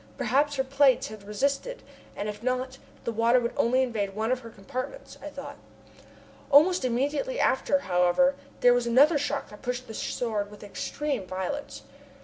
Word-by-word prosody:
Perhaps 285 +5 +1
her 265 - +1
plates 270 -3 +3
had 215 -2 -11
resisted, 280 - -2 0.3
and 205 - -4
if 210 0 -6
not, 255 +1 -2 0.2
the 235 - -2
water 230 +3 +3
would 235 -1 -2
only 255 +3 +3
invade 205 -6 -2
one 220 +3 -1
of 255 - +1
her 230 -2 -10
compartments, 255 - -7
I - - -7
thought. - - -8 0.9
Almost 315 +5 +5
immediately 290 - -1
after, 280 +2 +2
however, 180 +8 +3 0.3
there 245 0 +7
was 245 -1 +1
another 285 +6 +5
shock 285 -1 -2
that 210 - -13
pushed 250 0 -3
the 220 - -8
Sword 215 -3 -2
with 210 0 -13
extreme 255 +2 -3
violence. 190 +11 -5
255 Hz, 165 wpm, -27 LUFS, 215-280 Hz, 0.9 s, there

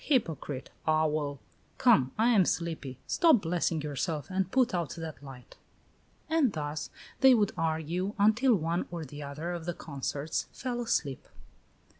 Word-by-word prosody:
Hypocrite! 160 - -1 0.2
Owl! 155 -3 +1 0.4
Come, 130 0 +4
I 225 +2 +4
am 215 -6 +5
sleepy; 160 -7 -2
stop 320 -11 +4
blessing 165 -2 0
yourself 150 +3 -3
and 190 -1 0
put 255 -4 +3
out 170 -7 -2
that 160 -5 -7
light." 135 -3 -12 0.7
And 315 -7 +2
thus 150 -1 -4 0.3
they 265 -2 +7
would 210 -3 +2
argue 165 +4 -1
until 220 +5 +4
one 170 0 -1
or 170 -2 -5
the 145 +2 -9
other 150 +4 -5
of 170 -2 -5
the 175 -1 -3
consorts 140 +1 -3
fell 245 -2 -3
asleep. 150 - -1
165 Hz, 145 wpm, -30 LUFS, 150-205 Hz, 0.7 s, they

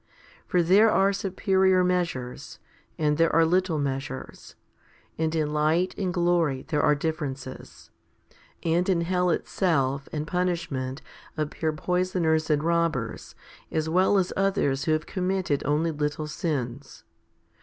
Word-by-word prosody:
For 180 -3 +2
there 200 +6 +5
are 195 0 +3
superior 190 -1 +2
measures, 175 -9 -2 0.4
and 150 0 +1
there 165 0 +4
are 165 0 +5
little 180 0 +1
measures, 135 -1 -5 0.6
and 160 0 -1
in 150 -2 0
light 160 +5 +1
and 190 -3 -2
glory 170 -6 +1
there 150 -3 +1
are 150 0 +4
differences, 140 -4 -5 0.7
and 170 +3 +1
in 175 -3 +2
hell 180 +1 +1
itself 140 -7 0
and 150 -1 -3
punishment 170 -7 -2 0.3
appear 155 +1 -1
poisoners 170 -1 0
and 150 -1 +2
robbers, 165 -8 -1 0.4
as 160 0 -1
well 185 +4 +3
as 185 -2 0
others 190 -9 +1
who 160 - +1
have 155 0 -1
committed 185 -5 -1
only 155 +3 +1
little 150 0 -2
sins. 140 -4 -4
160 Hz, 130 wpm, -26 LUFS, 150-180 Hz, 0.7 s, there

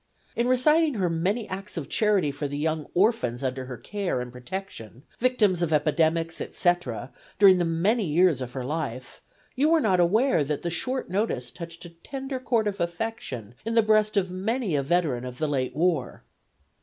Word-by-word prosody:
In 235 +1 +1
reciting 300 +4 +3
her 185 -5 0
many 195 +7 -1
acts 195 +1 -6
of 155 - -4
charity 205 -9 +2
for 145 +1 -4
the 145 +1 -5
young 155 0 -1
orphans 175 - +1
under 130 0 -2
her 125 -1 -7
care 200 - -3
and 125 0 -5
protection, 125 - -7 0.2
victims 215 -8 +2
of 170 -2 0
epidemics, 160 +2 +1
etc., 155 - -1 0.2
during 190 -2 +7
the 175 - +1
many 190 +7 +1
years 165 -3 +3
of 125 -1 -5
her 130 -2 -4
life, 135 -4 -5 0.3
you 285 +4 +3
were 330 0 +5
not 195 -10 +2
aware 210 - +3
that 145 0 -3
the 170 - -2
short 255 +5 -1
notice 185 - -1
touched 170 0 -9
a 170 - -10
tender 265 +10 -6
chord 235 -3 +1
of 205 -1 -2
affection 170 - -4
in 225 +1 -2
the 230 - +5
breast 215 0 +3
of 185 -2 +1
many 200 - -1
a 140 - +2
veteran 140 -4 0
of 125 0 -7
the 155 - -1
late 130 -3 -1
war. 160 -4 0
175 Hz, 185 wpm, -26 LUFS, 145-215 Hz, 0.3 s, during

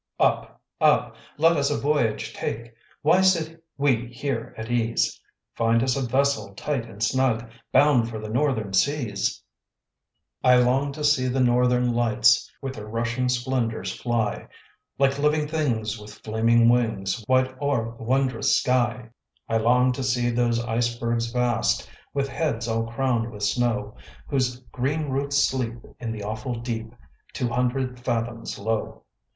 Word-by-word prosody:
Up! - - +1 0.2
up! - - +3 0.2
let 165 +2 +4
us 140 -1 +1
a 145 - 0
voyage 140 -7 0
take; 115 +1 -5 0.3
Why 170 +5 +5
sit 165 -3 +1
we 130 -4 +1
here 120 -1 -4
at 110 +1 -6
ease? 115 -1 0 0.3
Find 115 0 +2
us 130 -1 +1
a 135 - -1
vessel 125 -5 0
tight 120 -1 -3
and 105 +2 -6
snug, 120 -2 +1 0.2
Bound 130 -4 +4
for 115 - -5
the 110 0 -6
northern 110 -4 0
seas. 120 -2 0 1.0
I 125 0 +6
long 130 +3 +2
to 150 +1 -6
see 145 -3 +3
the 130 +1 0
northern 125 0 +3
lights 120 -2 +3
With 135 -1 -3
their 105 -4 -8
rushing 120 +3 -1
splendors 120 -2 -1
fly, 115 -3 -2 0.5
Like 140 0 +2
living 150 +1 +2
things 115 -9 -1
with 105 0 -11
flaming 115 +2 +3
wings, 115 -3 +1
Wide 130 0 +2
o'er 120 -6 0
the 115 - -10
wondrous 135 +2 +2
sky. 125 -2 0 0.4
I 115 - +1
long 125 +3 +3
to 125 - -4
see 120 -1 +1
those 120 -1 +1
icebergs 115 0 -1
vast, 125 -2 +1 0.2
With 140 -1 -1
heads 135 -6 -2
all 115 0 -1
crowned 120 -1 0
with 105 -2 -8
snow, 105 -1 0 0.3
Whose 130 -3 0
green 145 +4 -1
roots 140 +1 0
sleep 125 -3 -2 0.2
in 115 -2 -4
the 110 -2 -5
awful 110 +4 -4
deep, 115 -1 -5 0.4
Two 125 -2 -1
hundred 125 +1 -1
fathoms 115 -1 -3
low. 110 +1 -3
120 Hz, 150 wpm, -25 LUFS, 115-135 Hz, 1.0 s, I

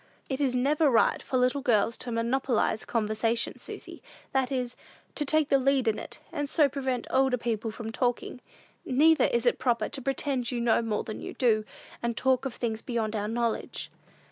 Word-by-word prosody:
"It 265 +1 -2
is 260 -3 +1
never 290 +4 +3
right 235 -3 +3
for 260 - -1
little 255 +3 +2
girls 230 -3 +2
to 245 - -5
monopolize 235 -1 0
conversation, 225 +1 0
Susy; - - -9 0.3
that 265 0 +1
is, 250 -2 -2 0.4
to 295 - -2
take 310 +1 +2
the 275 - +4
lead 265 -1 +2
in 220 - +1
it, - - -8
and 290 -3 -3
so 300 -2 +4
prevent 265 -3 -2
older 265 -1 +3
people 225 -2 -2
from 220 0 -6
talking. 245 +1 -1 0.4
Neither 310 +5 +4
is 235 +1 0
it 240 - +3
proper 245 -3 +1
to 275 - -6
pretend 270 -1 -1
to 245 -1 -2
know 235 -1 +3
more 220 -2 -1
than 215 - -6
we - - -6
do, 220 -4 +2 0.4
and 235 -2 -2
talk 260 0 +2
of 265 - -3
things 225 -2 -2
beyond 225 -3 -2
our 210 0 -1
knowledge." 230 0 -2
250 Hz, 190 wpm, -28 LUFS, 230-270 Hz, 0.4 s, the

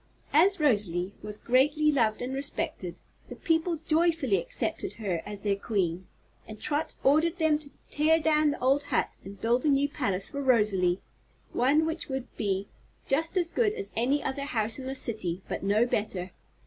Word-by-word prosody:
As 370 +6 +5
Rosalie 200 - +2
was 210 0 -3
greatly 295 +6 +3
loved 230 -5 +1
and 255 +2 -4
respected, 280 +2 -2 0.3
the - - -8
people 325 +1 0
joyfully 320 - +2
accepted 170 +3 -3
her 195 -7 -3
as 205 -1 -5
their 200 -1 +1
Queen, 190 -4 -2 0.4
and 215 -1 -9
Trot 305 +1 -2
ordered 315 +5 +3
them 315 -3 +2
to 295 -2 -10 0.2
tear 315 +2 +3
down 305 -1 +3
the 290 - -3
old 270 +3 +3
hut 285 -3 0
and 200 +1 -10
build 240 +2 +1
a 300 - +2
new 280 0 +3
palace 200 -10 -2
for 280 -1 -3
Rosalie 210 -8 +2 0.5
one 285 +6 +3
which 320 +1 -3
would 265 -2 -5
be 200 -1 -1 0.4
just 325 +7 0
as 345 -2 +1
good 430 -3 +2
as 420 -3 -5
any 265 +6 +1
other 280 +1 -3
house 225 -2 0
in 260 - -6
the 265 - -3
City, 185 -8 -3
but - - -4
no 205 +4 +3
better. 195 -6 -2
265 Hz, 175 wpm, -28 LUFS, 205-305 Hz, 0.5 s, As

